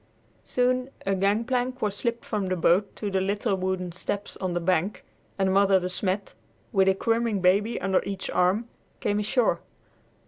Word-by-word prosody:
Soon 255 Hz, +1 st, +1 dB, 0.2 s
a 195 Hz, -, +1 dB
gangplank 240 Hz, +6 st, 0 dB
was 210 Hz, -4 st, -1 dB
slipped 235 Hz, +2 st, -2 dB
from 205 Hz, -3 st, -2 dB
the 185 Hz, -, 0 dB
boat 180 Hz, +3 st, +2 dB
to 205 Hz, -2 st, -4 dB
the 190 Hz, 0 st, +1 dB
little 200 Hz, +1 st, 0 dB
wooden 185 Hz, -1 st, -2 dB
steps 200 Hz, +3 st, -4 dB
on 185 Hz, -2 st, -2 dB
the -, -, +1 dB
bank, 185 Hz, +3 st, 0 dB, 0.3 s
and 190 Hz, -1 st, +2 dB
Mother 195 Hz, -1 st, +5 dB
De 180 Hz, 0 st, -3 dB
Smet, 190 Hz, +2 st, -2 dB, 0.4 s
with 195 Hz, -4 st, +3 dB
a 190 Hz, -, +4 dB
squirming 230 Hz, 0 st, +1 dB
baby 200 Hz, +5 st, +2 dB
under 190 Hz, -1 st, +2 dB
each 195 Hz, -1 st, -4 dB
arm, 190 Hz, +6 st, +2 dB, 0.3 s
came 205 Hz, 0 st, 0 dB
ashore. 225 Hz, +3 st, +1 dB
200 Hz, 170 wpm, -26 LUFS, 185-220 Hz, 0.4 s, Mother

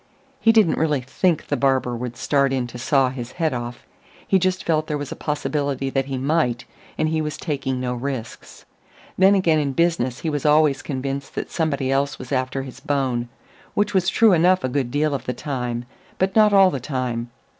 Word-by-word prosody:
He 225 Hz, -, +5 dB
didn't 215 Hz, -7 st, +3 dB
really 150 Hz, -4 st, +1 dB
think 160 Hz, +6 st, 0 dB
the 145 Hz, -, -1 dB
barber 130 Hz, -2 st, +1 dB
would 120 Hz, 0 st, -5 dB
start 140 Hz, -2 st, +1 dB
in 130 Hz, -2 st, 0 dB
to 120 Hz, 0 st, -9 dB
saw 130 Hz, +1 st, +2 dB
his 125 Hz, -2 st, -7 dB
head 165 Hz, -4 st, 0 dB
off; 120 Hz, 0 st, -6 dB, 0.4 s
he 190 Hz, -, +4 dB
just 185 Hz, 0 st, 0 dB
felt 155 Hz, -2 st, 0 dB
there 150 Hz, -, -1 dB
was 145 Hz, -2 st, -6 dB
a -, -, -4 dB
possibility 145 Hz, -3 st, -2 dB
that 135 Hz, -1 st, 0 dB
he 135 Hz, -1 st, -3 dB
might, 130 Hz, -3 st, 0 dB, 0.3 s
and 155 Hz, -, +1 dB
he 160 Hz, 0 st, 0 dB
was 150 Hz, -1 st, -3 dB
taking 135 Hz, -5 st, -2 dB
no 125 Hz, -1 st, -2 dB
risks. 125 Hz, -2 st, -6 dB, 0.5 s
Then 190 Hz, +2 st, +5 dB
again 170 Hz, -5 st, +3 dB
in 140 Hz, -2 st, -1 dB
business 160 Hz, -6 st, 0 dB
he 165 Hz, -, -1 dB
was 145 Hz, -2 st, -2 dB
always 150 Hz, -2 st, +4 dB
convinced 135 Hz, 0 st, -4 dB
that -, -, -4 dB
somebody 140 Hz, -5 st, -1 dB
else 140 Hz, +1 st, 0 dB
was 130 Hz, +1 st, -10 dB
after 130 Hz, 0 st, -1 dB
his 130 Hz, -2 st, -10 dB
bone 130 Hz, -4 st, -1 dB, 0.5 s
which 205 Hz, -, +1 dB
was 190 Hz, -1 st, +2 dB
true 225 Hz, -3 st, +5 dB
enough 180 Hz, +2 st, +4 dB
a 130 Hz, -, 0 dB
good 130 Hz, -1 st, -1 dB
deal 145 Hz, +3 st, 0 dB
of 140 Hz, -, -4 dB
the 125 Hz, -, 0 dB
time; 125 Hz, -2 st, -4 dB, 0.3 s
but 190 Hz, +1 st, 0 dB
not 215 Hz, -1 st, +6 dB
all 195 Hz, -2 st, +6 dB
the 135 Hz, -, -3 dB
time. 125 Hz, -3 st, -3 dB
140 Hz, 205 wpm, -22 LUFS, 130-160 Hz, 0.5 s, not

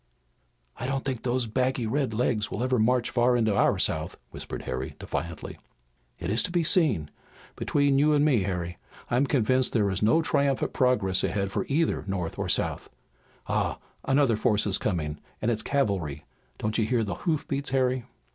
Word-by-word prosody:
"I 125 Hz, -, -4 dB
don't 135 Hz, 0 st, -2 dB
think 130 Hz, -4 st, -2 dB
those 125 Hz, 0 st, 0 dB
baggy 125 Hz, +2 st, 0 dB
red 135 Hz, +2 st, 0 dB
legs 110 Hz, -1 st, 0 dB
will 110 Hz, -, -3 dB
ever 130 Hz, -1 st, +1 dB
march 120 Hz, +2 st, +2 dB
far 120 Hz, 0 st, +3 dB
into 110 Hz, -3 st, +2 dB
our -, -, +3 dB
South," -, -, -1 dB
whispered -, -, -7 dB
Harry 65 Hz, +1 st, -4 dB
defiantly. 85 Hz, -1 st, -5 dB, 0.6 s
"It 85 Hz, +2 st, -3 dB
is 110 Hz, -, +2 dB
to -, -, -1 dB
be 175 Hz, -1 st, +1 dB
seen. 150 Hz, -, +2 dB, 0.4 s
Between 140 Hz, -1 st, +2 dB
you 150 Hz, +1 st, +4 dB
and 145 Hz, 0 st, +4 dB
me, 130 Hz, -8 st, +3 dB
Harry, 90 Hz, -2 st, -3 dB, 0.3 s
I'm 125 Hz, +4 st, +3 dB
convinced 130 Hz, -1 st, +2 dB
there 105 Hz, -4 st, +2 dB
is 95 Hz, -, -2 dB
no 135 Hz, +10 st, +4 dB
triumphant 140 Hz, -2 st, +1 dB
progress 105 Hz, -8 st, +2 dB
ahead 100 Hz, -1 st, -1 dB
for -, -, -2 dB
either 160 Hz, +4 st, +1 dB
North 90 Hz, -4 st, -3 dB
or -, -, -2 dB
South. -, -, -1 dB, 0.6 s
Ah, -, -, 0 dB, 0.3 s
another 135 Hz, -5 st, +3 dB
force 105 Hz, -1 st, +2 dB
is 100 Hz, -2 st, 0 dB
coming 80 Hz, -6 st, -2 dB, 0.2 s
and 115 Hz, -, 0 dB
it's 110 Hz, -1 st, 0 dB
cavalry! 100 Hz, -, -1 dB, 0.3 s
Don't 110 Hz, +2 st, -1 dB
you 110 Hz, -, +2 dB
hear 120 Hz, -1 st, +1 dB
the 105 Hz, -, -3 dB
hoof 160 Hz, -4 st, -2 dB
beats, 140 Hz, 0 st, -2 dB
Harry?" 130 Hz, -2 st, +1 dB
120 Hz, 180 wpm, -27 LUFS, 100-135 Hz, 0.6 s, you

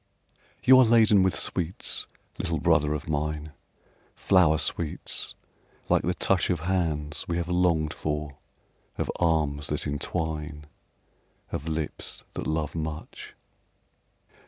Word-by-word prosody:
You 130 Hz, 0 st, +8 dB
are -, -, +8 dB
laden 110 Hz, -4 st, +5 dB
with 95 Hz, 0 st, +2 dB
sweets, 90 Hz, 0 st, -1 dB, 0.3 s
little -, -, -1 dB
brother 75 Hz, 0 st, +3 dB
of 75 Hz, -, -6 dB
mine, 75 Hz, 0 st, -2 dB, 0.6 s
Flower 85 Hz, -5 st, +4 dB
sweets, 80 Hz, +1 st, -2 dB, 0.5 s
like -, -, +4 dB
the 90 Hz, +1 st, -1 dB
touch 95 Hz, 0 st, +2 dB
Of 90 Hz, -4 st, 0 dB
hands 80 Hz, -5 st, -1 dB
we 85 Hz, -, -1 dB
have 85 Hz, -1 st, -2 dB
longed 85 Hz, -3 st, +1 dB
for, 75 Hz, -2 st, -4 dB, 0.6 s
of -, -, -1 dB
arms 75 Hz, -4 st, +1 dB
that 75 Hz, -, -2 dB
entwine, 75 Hz, 0 st, -3 dB, 0.9 s
Of 80 Hz, -, -4 dB
lips 80 Hz, -2 st, -3 dB
that -, -, -4 dB
love 80 Hz, -2 st, -1 dB
much. 80 Hz, -1 st, -6 dB
80 Hz, 120 wpm, -27 LUFS, 75-90 Hz, 0.9 s, You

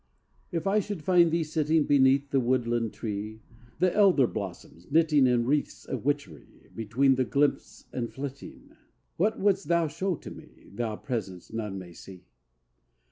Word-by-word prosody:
II 170 Hz, -, -1 dB
If 165 Hz, -, -4 dB
I 200 Hz, +2 st, +3 dB
should 205 Hz, -5 st, -5 dB
find 175 Hz, -1 st, +5 dB
thee 165 Hz, +1 st, +1 dB
sitting 155 Hz, 0 st, +1 dB
Beneath 140 Hz, 0 st, +3 dB
the 135 Hz, -, +3 dB
woodland 120 Hz, -2 st, 0 dB
tree, 110 Hz, 0 st, -6 dB, 0.3 s
The 185 Hz, -1 st, +1 dB
elder 190 Hz, -10 st, +5 dB
blossoms 95 Hz, -5 st, -7 dB
knitting 155 Hz, -3 st, +4 dB
In 120 Hz, -1 st, +2 dB
wreaths 145 Hz, +3 st, -1 dB
of 130 Hz, -2 st, -5 dB
witchery, 140 Hz, -, -4 dB
Between 115 Hz, +5 st, +2 dB
the 130 Hz, 0 st, +1 dB
glimpse 140 Hz, +3 st, -1 dB
and 120 Hz, -2 st, -3 dB
flitting, 140 Hz, 0 st, -8 dB, 0.5 s
What 215 Hz, +6 st, +1 dB
wouldst 195 Hz, 0 st, +1 dB
thou 170 Hz, -1 st, +2 dB
show 185 Hz, +4 st, -2 dB
to -, -, -10 dB
me, -, -, -15 dB
Thou 110 Hz, 0 st, -3 dB
presence 105 Hz, -7 st, -5 dB
none 105 Hz, -3 st, -4 dB
may 90 Hz, -2 st, -9 dB
see? 95 Hz, 0 st, -13 dB
135 Hz, 160 wpm, -28 LUFS, 115-160 Hz, 0.5 s, find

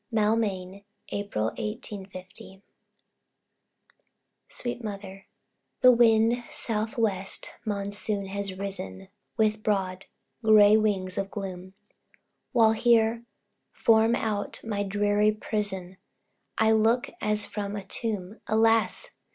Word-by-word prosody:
Maulmain, 210 Hz, -3 st, 0 dB, 0.3 s
April, 200 Hz, -, -2 dB
1850. 195 Hz, -3 st, -7 dB, 1.8 s
SWEET 240 Hz, -1 st, -5 dB
MOTHER. 195 Hz, -2 st, -7 dB, 0.5 s
The 255 Hz, -, +9 dB
wild, 230 Hz, 0 st, +4 dB
south 220 Hz, 0 st, -2 dB
west 195 Hz, -4 st, -1 dB
Monsoon 205 Hz, 0 st, -2 dB
has 195 Hz, -1 st, -4 dB
risen, 190 Hz, -, -5 dB, 0.3 s
With 215 Hz, -1 st, +2 dB
broad, 190 Hz, -3 st, -1 dB, 0.4 s
gray 215 Hz, -1 st, +7 dB
wings 200 Hz, -4 st, 0 dB
of 195 Hz, 0 st, -3 dB
gloom, 190 Hz, -2 st, -7 dB, 0.8 s
While 225 Hz, -4 st, +5 dB
here, 230 Hz, 0 st, +3 dB, 0.5 s
from 225 Hz, +1 st, +4 dB
out 210 Hz, -3 st, -2 dB
my 210 Hz, -3 st, -2 dB
dreary 205 Hz, +1 st, +2 dB
prison, 195 Hz, -4 st, -3 dB, 0.6 s
I 220 Hz, 0 st, +4 dB
look, 225 Hz, +3 st, +2 dB
as 210 Hz, -1 st, 0 dB
from 205 Hz, -1 st, -4 dB
a 200 Hz, -, -5 dB
tomb 205 Hz, -1 st, -4 dB
Alas! 225 Hz, -2 st, +2 dB
210 Hz, 100 wpm, -27 LUFS, 195-220 Hz, 1.8 s, The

